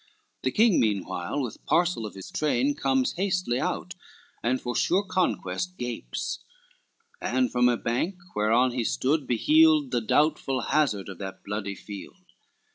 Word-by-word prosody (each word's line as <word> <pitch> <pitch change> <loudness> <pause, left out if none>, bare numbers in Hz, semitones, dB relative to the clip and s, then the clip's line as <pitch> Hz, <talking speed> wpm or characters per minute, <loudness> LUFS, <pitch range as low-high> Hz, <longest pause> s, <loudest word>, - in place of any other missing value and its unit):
The 130 - +1
king 215 - +4
meanwhile 100 0 -1
with 125 -5 -5
parcel 170 -10 +2
of 105 - -11
his 95 - -9
train 145 -2 +1
Comes 135 -2 +1
hastily 180 -10 0
out, - - -2 0.5
and 125 +3 +1
for 120 -1 -4
sure 190 +3 +2
conquest 185 -1 -1
gapes, 120 -2 -4 0.8
And 255 -1 +1
from 125 0 +4
a 120 - +1
bank 125 - -1 0.2
whereon 115 +4 +3
he 120 -1 -1
stood, 140 +5 0
beheld 150 +3 +4
The 120 -2 +1
doubtful 135 +1 +1
hazard 125 -9 +1
of 95 -3 -8
that 95 -1 -7
bloody 100 -1 -4
field. 100 0 -10
130 Hz, 145 wpm, -27 LUFS, 110-155 Hz, 0.8 s, king